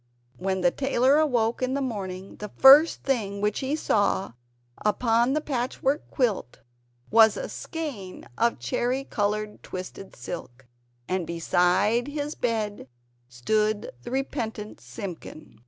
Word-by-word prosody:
When 190 0 -1
the 175 -1 +4
tailor 270 +1 +3
awoke 240 -7 +1
in 255 +1 0
the - - 0
morning, 195 -7 -5
the 210 - -6
first 290 +5 +8
thing 210 -7 -1
which 210 0 0
he 270 +2 -1
saw, 205 - +1 0.5
upon 230 +3 +2
the 305 - +1
patchwork 270 +1 -1
quilt, 220 - -1 0.5
was 220 -1 +6
a - - -4
skein 275 - -6
of 235 0 +1
cherry 240 - -1
coloured 210 -3 -2
twisted 185 +1 -8
silk, 125 -2 -8 0.4
and 185 -3 -1
beside 180 - +2
his 290 +1 -3
bed 215 - -2 0.4
stood 210 - 0
the - - -8
repentant 235 -5 -4
Simpkin! 175 - -9
220 Hz, 125 wpm, -26 LUFS, 190-265 Hz, 0.5 s, first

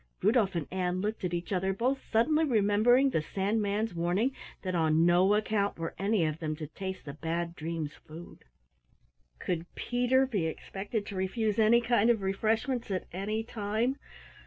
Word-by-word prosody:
Rudolf 215 -6 +3
and 165 -4 -1
Ann 180 -1 -1
looked 210 +2 -3
at 180 - -1
each 175 +3 -4
other, 190 +1 0
both 255 +7 0
suddenly 300 +8 +3
remembering 245 +1 +4
the 160 - +1
Sandman's 205 +4 -1
warning 180 +10 0 0.3
that 185 -1 -2
on 160 -1 +3
no 180 +4 +4
account 210 -1 0
were 165 0 -4
any 200 -3 +2
of 155 0 -2
them 155 -2 -2
to 155 0 -6
taste 190 +5 -6
the 140 - -6
Bad 170 +2 -3
Dreams' 160 -2 -4
food. 165 +3 -11 0.9
Could 170 - -3
Peter 250 +2 +2
be 205 -11 -1
expected 200 +6 -4
to 200 - -7
refuse 205 +3 -1
any 225 +2 +5
kind 235 -1 +3
of 225 -4 +2
refreshments 225 +6 0
at 185 -2 -2
any 210 +4 -2
time? 220 +3 -1
200 Hz, 165 wpm, -30 LUFS, 175-225 Hz, 0.9 s, any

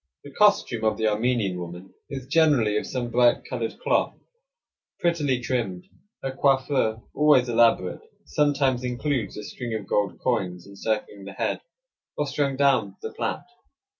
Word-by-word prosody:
The 145 - -11
costume 200 - +3
of 110 -1 +2
the 110 - -1
Armenian 105 -4 0
woman 90 +2 -8 0.2
is 135 -3 -6
generally 140 -8 +3
of - - -2
some 120 -2 -3
bright 120 +1 +3
colored 120 -3 -4
cloth, - - 0 0.8
prettily 150 -7 +1
trimmed. 115 -8 -2 0.4
Her 135 - -2
coiffure, 130 -4 +1
always 145 -4 +4
elaborate, 115 -6 +2 0.2
sometimes 140 -4 +1
includes 125 0 -2
a 105 - -6
string 115 +1 -5
of 105 -2 -4
gold 100 0 0
coins, 90 -8 -1
encircling 100 0 -4
the 100 - -8
head, - - -2 0.6
or 150 - 0
strung 140 -1 -1
down 130 -8 +2
the - - -5
plait. - - -3
120 Hz, 145 wpm, -25 LUFS, 105-135 Hz, 0.8 s, always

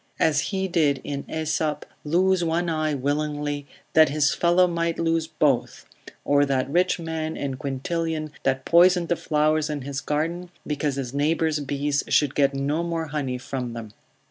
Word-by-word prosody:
As 150 -2 +3
he 190 -1 -1
did 155 -6 +2
in 140 -1 -4
Aesop, 155 -1 -1 0.2
lose 180 +4 +2
one 170 +1 0
eye 155 -2 0
willingly, 145 +1 -2 0.3
that 160 -2 +6
his 145 0 +2
fellow 175 +1 +4
might 170 -1 -1
lose 165 -1 0
both, 150 -6 0 0.4
or 145 0 +4
that 135 -2 0
rich 180 +3 +2
man 160 -1 -4
in 140 -1 -3
Quintilian 155 +4 -3
that 135 0 0
poisoned 175 0 +5
the 175 - +3
flowers 155 0 +1
in 145 -3 -3
his 140 +1 -4
garden, 165 +4 -2 0.2
because 145 -1 -1
his 135 -2 -4
neighbour's 155 +2 +1
bees 145 0 -1
should 145 -2 +2
get 140 -1 +2
no 145 +4 0
more 165 -2 -3
honey 140 -4 -2
from 125 -1 -5
them. 115 -2 -7
150 Hz, 165 wpm, -24 LUFS, 140-165 Hz, 0.4 s, that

